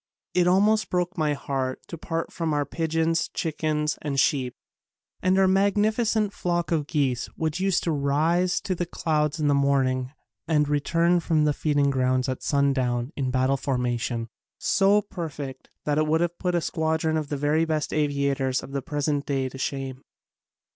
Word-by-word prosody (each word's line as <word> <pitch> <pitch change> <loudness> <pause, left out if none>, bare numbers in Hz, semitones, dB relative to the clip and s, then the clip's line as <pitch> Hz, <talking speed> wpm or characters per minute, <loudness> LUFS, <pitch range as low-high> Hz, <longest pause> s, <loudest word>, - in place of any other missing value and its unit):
It 180 -1 +3
almost 205 +2 +3
broke 180 0 -1
my 155 -3 +1
heart 135 -2 -3
to - - -5
part 165 0 -4
from 165 -3 -1
our 145 -1 +1
pigeons, 165 +2 0
chickens 155 -1 -1
and 140 -2 -1
sheep, 130 -5 +1 0.7
and 185 +1 +2
our 190 0 +5
magnificent 210 +2 +2
flock 175 -2 -1
of 155 -3 0
geese 135 -6 0
which 160 +2 -2
used 190 -1 +1
to 170 - 0
rise 155 +5 +1
to 190 - -2
the 175 -1 -3
clouds 155 -2 0
in 150 - +1
the 145 - +4
morning 135 -2 +1 0.4
and 150 -2 +2
return 165 +4 +2
from 160 -2 +1
the 150 - +2
feeding 145 -2 +1
grounds 130 0 +1
at 130 -1 -3
sundown 130 -3 +1
in 135 -3 -1
battle 130 +2 +1
formation, 120 -3 -1 0.3
so 195 +1 +3
perfect 145 -8 -7 0.2
that 150 0 +1
it 155 - +1
would 160 +2 +2
have 175 0 -1
put 180 -1 0
a 170 - +2
squadron 160 -1 0
of 155 -2 -2
the 145 - -2 0.3
best 155 -1 -1
aviators 140 -3 0
of - - -9
the 140 0 -2
present 145 -1 -2
day 135 -2 0
to 135 - -10
shame. 135 -1 -3
150 Hz, 170 wpm, -25 LUFS, 140-170 Hz, 0.7 s, our